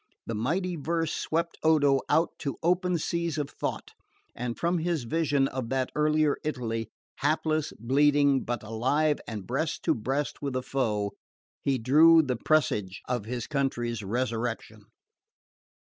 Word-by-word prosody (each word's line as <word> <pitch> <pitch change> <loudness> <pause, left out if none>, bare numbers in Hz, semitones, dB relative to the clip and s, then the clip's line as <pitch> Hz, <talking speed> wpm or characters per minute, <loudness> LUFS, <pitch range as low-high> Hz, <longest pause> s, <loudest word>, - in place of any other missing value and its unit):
The - - -4
mighty 170 - -1
verse 165 +2 -1
swept 170 +1 -2
Odo 145 -4 +4
out 160 +3 +3
to 140 - -3
open 180 +1 +2
seas 170 0 -2
of 145 -1 -2
thought, - - -4 0.4
and 120 0 -4
from 170 +1 +1
his 165 -4 -1
vision 145 0 +1
of 130 -3 -4
that 130 -1 -1
earlier 150 -1 +2
Italy, 115 -6 -3 0.3
hapless, 155 +1 0
bleeding, 140 +3 +3
but 120 -3 -3
alive 130 +8 +1
and 105 -4 -5
breast 150 +6 -2
to - - +3
breast 135 +6 -2
with 140 -2 -3
the 130 0 -2
foe, 105 -7 -1 0.5
he 135 -2 +1
drew 160 +7 +6
the 130 -3 -1
presage 105 -9 0
of 120 -4 -2
his 120 0 -4
country's 120 -4 -1
resurrection. 115 -1 -3
140 Hz, 145 wpm, -28 LUFS, 120-155 Hz, 0.5 s, drew